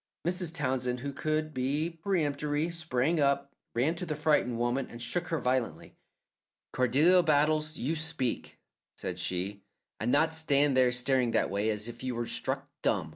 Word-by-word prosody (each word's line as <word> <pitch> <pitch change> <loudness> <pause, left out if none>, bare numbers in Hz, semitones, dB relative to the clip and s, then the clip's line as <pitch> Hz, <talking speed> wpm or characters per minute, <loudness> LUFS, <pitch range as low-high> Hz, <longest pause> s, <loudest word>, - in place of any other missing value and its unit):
Mrs. 175 -1 -1
Townsend, 125 -4 -1
who 140 +1 -4
could 155 +2 -1
be 140 +5 0 0.2
peremptory, 150 -3 0
sprang 160 -1 0
up, 140 0 +1 0.2
ran 130 +7 +2
to 180 - -4
the 155 - -2
frightened 150 -6 +2
woman 120 +3 0
and 120 - -9
shook 175 +9 -2
her 165 - -1
violently. 125 -3 -1 0.8
"Cordelia 145 +9 +4
Battles, 155 0 +2
you 150 +6 -1
speak," 155 -6 -2 0.4
said - - -4
she, 95 +3 -2 0.4
"and 115 +3 0
not 160 +3 +3
stand 145 -3 +3
there 130 -1 +5
staring 125 0 +2
that - - +2
way, 100 +2 0
as 105 0 -1
if 120 0 -8
you 130 -1 -3
were 120 0 -2
struck - - -2
dumb! - - +1
140 Hz, 165 wpm, -30 LUFS, 125-155 Hz, 0.8 s, there